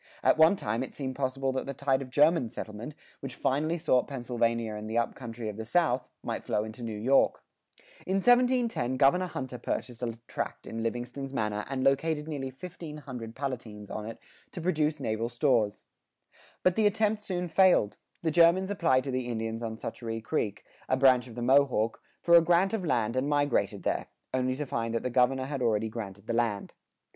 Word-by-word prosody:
At - - +4
one 160 +4 +7
time 115 - -2
it 130 - -6
seemed 130 -2 -4
possible 135 0 -1
that 130 0 -3
the 140 - -4
tide 135 0 +1
of 130 - -7
German 145 -1 +4
settlement, 110 +7 -7 0.2
which 135 -3 -7
finally 155 +5 0
sought 150 -6 +2
Pennsylvania 115 -4 -1
and 105 +1 -6
the 115 - -1
up 120 - +1
country 115 -3 -7
of 105 -1 -5
the 110 - -4
South, 130 +1 +1
might - - -3
flow 105 - 0
into 110 +3 -8
New 110 -2 -4
York. 130 +6 +3 0.6
In 190 - +1
1710, 245 - +3
Governor 150 +8 +4
Hunter 130 -6 -5
purchased 120 0 -4
a 115 -2 -3
tract - - -5
in 115 - -5
Livingston's 120 +4 -4
manor 105 -3 -1
and 135 -1 -2
located 150 +3 +1
nearly 140 -4 -4
fifteen 150 +2 -9
hundred 125 -6 -8
Palatines 120 -7 -5
on 105 0 -4
it 115 - -7 0.4
to - - -5
produce 155 -3 0
naval 115 -2 -2
stores.[82:1] 120 -4 +1 0.8
But 185 - +4
the 220 -1 +4
attempt 215 0 +1
soon 180 -3 -3
failed; 175 - +4 0.3
the 160 - +1
Germans 170 +4 +4
applied 130 -10 +2
to 135 - -3
the 130 -1 -2
Indians 115 -1 -3
on 110 -1 -4
Schoharie 115 -1 -5
Creek, 105 -2 -2 0.3
a 130 - +3
branch 130 -2 +5
of 115 - -11
the 120 - -4
Mohawk, 130 -4 +3 0.2
for 170 - +3
a 170 - +10
grant 175 +4 +3
of 220 -4 -1
land 120 -7 0
and 130 +3 0
migrated 145 -2 +1
there, - - -1 0.3
only 130 0 +1
to 150 +2 -3
find 115 -3 -2
that 115 - -1
the 125 - -2
governor 130 +2 +2
had 140 -1 -4
already 110 -2 +1
granted 105 -3 -7
the 115 - -2
land. 115 -4 -1
130 Hz, 195 wpm, -29 LUFS, 115-150 Hz, 0.8 s, a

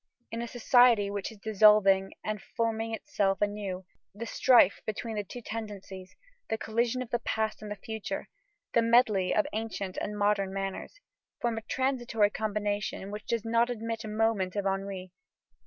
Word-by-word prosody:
In 230 - -3
a 235 - -3
society 240 -3 +4
which 200 +2 -3
is 220 - -13
dissolving 200 -2 +5
and 215 -2 -3
forming 225 0 -2
itself 205 -5 0
anew, 205 -3 -2 0.3
the 230 +3 -5
strife 235 -4 +5
between 220 +1 -3
the 210 - -1
two 240 +5 -9
tendencies, 200 -4 -7 0.3
the 220 - 0
collision 235 +3 0
of 240 - -14
the 240 - +1
past 220 -1 -2
and 210 - -7
the 210 - -3
future, 220 +1 -5 0.5
the 235 - +5
medley 230 -5 +4
of 210 - +3
ancient 215 -4 -4
and 210 0 -4
modern 205 -2 +1
manners, 195 - -5 0.4
form 235 -2 -1
a - - -14
transitory 240 -4 +1
combination 205 -2 -2
which 210 0 -7
does 230 -1 -1
not 230 +1 +2
admit 230 -1 -3
a - - -6
moment 215 -3 0
of 200 -1 -1
ennui. 195 -1 -3
215 Hz, 165 wpm, -29 LUFS, 200-230 Hz, 0.5 s, dissolving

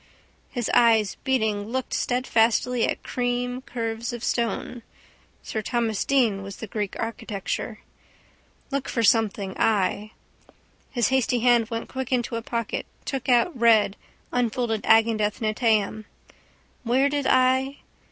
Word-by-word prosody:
His 240 -3 -3
eyes 225 -4 +4
beating 220 -6 0
looked 260 +2 -3
steadfastly 245 -1 +1
at - - -3
cream 245 0 -2
curves 230 -1 -4
of 240 -1 -7
stone. 235 0 -2 0.6
Sir 220 - -3
Thomas 225 -1 -1
Deane 235 -8 +2
was 195 0 -7
the - - -7
Greek 210 -1 -4
architecture. 225 -1 -4 0.9
Look 275 -1 -2
for 230 - 0
something 205 -3 +2
I. 210 0 +1 0.8
His 240 -5 +1
hasty 255 -2 +1
hand 240 -2 +4
went 230 -1 -4
quick 265 0 -5
into 240 -2 0
a 230 - -2
pocket, 230 -1 -3 0.2
took 270 -1 -3
out, 250 +8 +3
read 225 -4 +4 0.4
unfolded 235 -2 -1
Agendath 220 -2 +3
Netaim. 215 -1 +1 0.8
Where 255 +3 +2
did 285 -1 -1
I? 260 +2 +3
230 Hz, 125 wpm, -25 LUFS, 220-250 Hz, 0.9 s, eyes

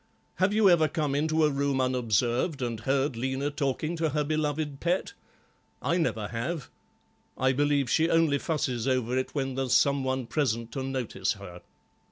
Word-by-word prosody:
Have 185 +2 +2
you 215 -1 +4
ever 170 -4 +5
come 150 -3 -1
into 155 +2 +2
a 150 - +2
room 140 -1 0
unobserved 125 - 0
and 115 -2 -3
heard 135 +3 0
Lena 130 +4 -2
talking 145 +3 -2
to 160 -1 +1
her 150 +1 0
beloved 150 -1 -2
pet? 180 - -1 0.7
I 170 - 0
never 110 - -1
have. 130 +6 -4 0.7
I 130 0 +3
believe 145 0 +2
she 160 +5 +2
only 165 -4 +3
fusses 130 -7 -1
over 125 -2 +1
it 130 +3 -2
when 135 -2 -1
there's 130 -1 -1
some 140 -1 +3
one 130 -1 -1
present 115 -4 -1
to 135 - -4
notice 125 -7 -2
her." 95 -4 -11
140 Hz, 170 wpm, -28 LUFS, 125-155 Hz, 0.7 s, ever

